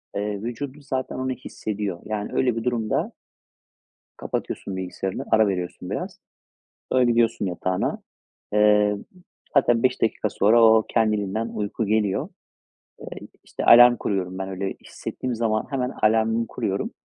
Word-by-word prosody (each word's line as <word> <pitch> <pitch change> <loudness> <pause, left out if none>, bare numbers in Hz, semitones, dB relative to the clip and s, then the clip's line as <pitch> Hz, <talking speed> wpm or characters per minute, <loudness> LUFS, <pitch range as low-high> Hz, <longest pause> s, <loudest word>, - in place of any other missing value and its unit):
Eee, 105 0 -2
vücudun 130 +5 -5
zaten 130 -2 -3
onu 130 0 -2
hissediyor. 105 -6 -5
Yani, 105 -1 -3
öyle 125 -3 +1
bir 115 - -3
durumda 115 -3 -1 1.1
kapatıyorsun 95 - -4
bilgisayarını. 95 +1 -4
Ara 110 -1 +5
veriyorsun 90 -3 -4
biraz. - - -5 0.7
Öyle, 130 -1 +4
gidiyorsun 115 -2 +2
yatağına. 90 0 -2 0.5
Eee, 105 0 +4
m 100 - -9 0.5
hatta 120 -4 +3
5 130 0 +1
dakika 110 -1 0
sonra 110 +4 +4
o, 110 -1 +6
kendiliğinden 110 -1 0
uyku 105 +2 -2
geliyor. 105 -2 0 0.9
Eee, - - -11
i - - -29
işte - - -6
alarm 120 +1 +8
kuruyorum 95 -4 -2
ben, 95 0 -4
öyle 95 0 -3
hissettiğim 125 -1 -5
zaman 110 -1 0
hemen 130 -2 -1
alarmımı 110 +1 +2
kuruyorum. - - -3
110 Hz, 135 wpm, -24 LUFS, 100-120 Hz, 1.1 s, alarm